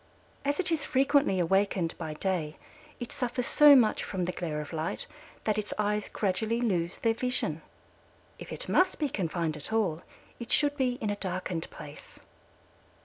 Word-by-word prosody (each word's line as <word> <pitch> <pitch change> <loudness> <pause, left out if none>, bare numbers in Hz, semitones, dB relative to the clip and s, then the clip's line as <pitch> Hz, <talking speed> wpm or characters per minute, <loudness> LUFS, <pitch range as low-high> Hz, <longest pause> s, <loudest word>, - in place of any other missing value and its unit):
As 285 +3 0
it 360 -2 +1
is 315 -4 0
frequently 275 -6 +3
awakened 185 -1 +1
by 160 -2 -4
day 160 -3 -2 0.4
it 240 - -6
suffers 250 0 -2
so 295 -1 +8
much 230 -5 +4
from 185 -2 -2
the 180 - -1
glare 160 -4 -3
of 150 +2 -7
light 165 +5 -2 0.4
that 215 -1 +1
its 210 - -4
eyes 210 0 0
gradually 220 +4 0
lose 180 -7 0
their 230 -1 +2
vision. 250 +2 -1 0.8
If - - -9
it - - -2
must 370 0 +3
be 295 -3 0
confined 170 -6 -1
at 150 - -7
all 190 -8 +1 0.4
it 235 -1 -7
should 290 -1 +3
be 260 -3 +1
in 215 -2 0
a - - -1
darkened 185 -3 -3
place. - - -11
210 Hz, 170 wpm, -29 LUFS, 175-250 Hz, 0.8 s, so